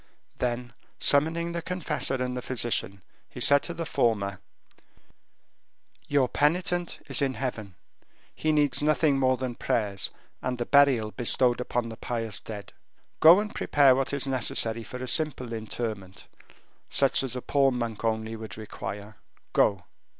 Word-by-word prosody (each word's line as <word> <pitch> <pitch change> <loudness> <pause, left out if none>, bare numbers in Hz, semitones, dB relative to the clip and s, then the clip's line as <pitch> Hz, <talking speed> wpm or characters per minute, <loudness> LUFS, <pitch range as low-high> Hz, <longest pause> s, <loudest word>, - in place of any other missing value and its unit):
Then, 120 0 -2 0.2
summoning 165 +4 +2
the 170 0 -3
confessor 165 -6 -1
and 125 -1 -2
the 125 - -3
physician, 115 -6 -2 0.3
he - - -10
said 140 0 +5
to 170 - -4
the 165 - -4
former: 100 - 0 1.7
"Your 140 -3 +2
penitent 175 +4 0
is 135 -2 +1
in 135 -2 0
heaven; 110 -6 -5 0.6
he 155 - -1
needs 150 -2 +4
nothing 150 -2 +2
more 130 -1 +2
than 130 -1 -3
prayers 105 -4 -1 0.3
and 125 -1 -2
the 120 - -2
burial 135 -7 +4
bestowed 120 +1 +2
upon 120 -1 -2
the 115 - -9
pious 115 -4 -3
dead. 105 -2 -9 0.5
Go 165 +4 +8
and 210 0 -4
prepare 140 -3 +4
what 135 0 -1
is 140 -1 0
necessary 115 -3 0
for 125 - -8
a - - -5
simple 130 -5 0
interment, 110 -4 -5 0.6
such 135 -1 +3
as 130 -2 -4
a 125 - -4
poor 140 -1 +3
monk 115 -4 -4
only 110 0 -1
would 110 -3 -8
require. 105 -1 -7 0.4
Go." 100 -3 +2
125 Hz, 150 wpm, -27 LUFS, 110-140 Hz, 1.7 s, Go